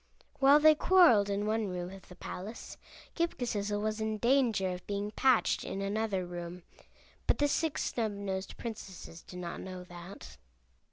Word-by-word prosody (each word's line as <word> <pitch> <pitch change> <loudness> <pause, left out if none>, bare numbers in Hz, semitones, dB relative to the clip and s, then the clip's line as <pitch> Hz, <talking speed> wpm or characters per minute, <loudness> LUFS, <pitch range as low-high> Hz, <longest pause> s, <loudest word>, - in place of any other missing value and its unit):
While 280 +2 +7
they 310 +1 +8
quarreled 305 - +5
in 200 +1 -1
one 215 0 0
room 180 -1 -4
of 195 0 -12
the 180 - -11
palace 195 +5 -7 0.4
Ghip 335 0 0
Ghisizzle 205 -4 -1
was 215 +1 -2
in 220 0 -1
danger 235 -5 +2
of 180 0 -7
being 205 +1 -2
patched 260 +1 +3
in 195 - -4
another 200 -1 -1
room; 175 0 -7 0.6
but - - +3
the 290 - +3
Six 315 +1 0
Snubnosed 200 -4 -3
Princesses 195 -7 -8
did 180 - -11
not 175 -1 -5
know 185 -1 -7
that. 175 +2 -11
205 Hz, 160 wpm, -31 LUFS, 185-235 Hz, 0.6 s, they